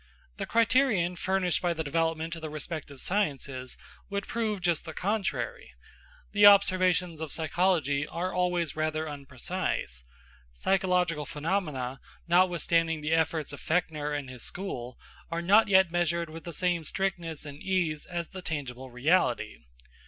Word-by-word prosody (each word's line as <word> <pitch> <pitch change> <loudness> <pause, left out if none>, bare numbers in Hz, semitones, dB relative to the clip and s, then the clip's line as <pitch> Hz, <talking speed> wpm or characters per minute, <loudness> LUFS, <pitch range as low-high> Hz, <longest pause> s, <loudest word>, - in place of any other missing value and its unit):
The - - -4
criterion 225 -6 +3
furnished 185 0 +1
by 175 -1 0
the 160 - -2
development 165 +2 -1
of 165 - -9
the 160 - -4
respective 155 -2 -6
sciences 140 -9 -1 0.3
would 200 0 -3
prove 220 -3 -1
just 175 -3 +1
the 160 -2 -8
contrary. 220 - -2 0.6
The 205 0 +7
observations 185 -4 +4
of 160 -3 -4
psychology 160 -4 +1
are 180 +2 -3
always 180 -3 0
rather 155 0 -1
unprecise. 140 - -4 0.5
Psychological 180 - +1
phenomena, 150 -6 -2 0.3
notwithstanding 170 -2 +3
the 150 +2 0
efforts 160 -2 0
of 145 - -8
Fechner 155 -3 0
and 145 -2 -3
his 125 -2 -8
school, 125 -11 -4 0.3
are 165 0 -2
not 205 +5 +6
yet 190 -3 +5
measured 170 -1 0
with 165 +1 -9
the 170 - -5
same 175 0 0
strictness 170 -3 -2
and 145 0 -9
ease 175 -6 0
as 175 -2 -4
the 190 - -8
tangible 130 -6 -5
reality. 145 +10 +1
170 Hz, 140 wpm, -29 LUFS, 150-185 Hz, 0.6 s, The